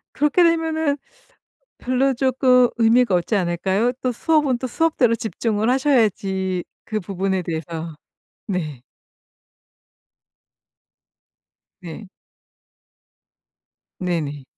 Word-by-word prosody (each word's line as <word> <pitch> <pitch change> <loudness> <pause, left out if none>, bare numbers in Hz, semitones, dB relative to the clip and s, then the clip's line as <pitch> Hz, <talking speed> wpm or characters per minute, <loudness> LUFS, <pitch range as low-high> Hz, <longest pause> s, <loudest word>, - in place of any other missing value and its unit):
그렇게 300 +4 +3
되면은 320 -3 +1 0.8
별로 260 +2 +1
쪼끔 255 -1 +3
의미가 230 -2 +4
없지 175 +5 0
않을까요? 190 +5 0
또 255 - 0
수업은 295 0 +1
또 255 - -3
수업대로 255 -4 +2
집중을 220 0 -2
하셔야지 205 -9 +1 0.2
그 215 - -2
부분에 190 0 -2
대해서 165 0 -5 0.5
네. 155 - -4 3.0
네. 180 +4 -9 1.9
네네. 155 -6 -3
225 Hz, 190 characters per minute, -21 LUFS, 180-260 Hz, 3.0 s, 의미가